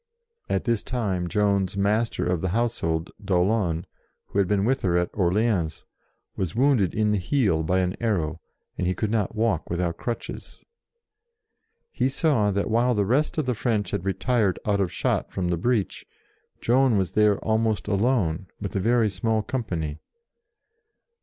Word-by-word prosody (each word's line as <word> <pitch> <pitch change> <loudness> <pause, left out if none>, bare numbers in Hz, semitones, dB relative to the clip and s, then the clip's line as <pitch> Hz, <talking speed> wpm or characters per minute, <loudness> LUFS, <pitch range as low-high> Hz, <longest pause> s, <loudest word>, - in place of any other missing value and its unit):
At - - 0
this 115 -3 0
time 100 -8 -2
Joan's 100 -1 +1
Master 105 +3 +1
of 90 -2 0
the 95 - -1
House 120 +4 0
hold, 80 0 -2
d'Aulon, 90 -3 +1 0.4
who 100 - -1
had 100 - +3
been 100 0 +1
with 130 +3 +1
her 90 -2 +2
at 90 0 0
Orleans, 95 -3 0 0.5
was 95 -2 -3
wounded 125 - +3
in 105 -1 +2
the 105 - +1
heel 95 - +1
by 90 +4 +1
an 90 0 -1
arrow, 85 -8 -1 0.4
and 90 - 0
he 90 - 0
could 110 -2 -2
not 110 -1 0
walk 110 -7 0
without 85 -1 -1
crutches. 120 -1 -6 1.3
He 130 - 0
saw 135 -7 +2
that 100 +2 -1
while 120 +2 +3
the 100 -1 +1
rest 135 +11 +1
of 155 - +1
the 125 - +1
French 110 -2 -1
had - - -2
retired 100 0 +1
out 100 -1 +1
of 90 -3 0
shot - - -1
from 90 -2 -2
the 85 - +1
breach, 110 +2 0 0.6
Joan 125 -1 +3
was 95 -2 0
there 105 -2 +3
almost 110 -4 +1
alone, 100 -5 +1
with 100 -1 -5
a - - +2
very 115 +3 +3
small 110 +3 0
company. 90 - -3
100 Hz, 165 wpm, -25 LUFS, 90-115 Hz, 1.3 s, had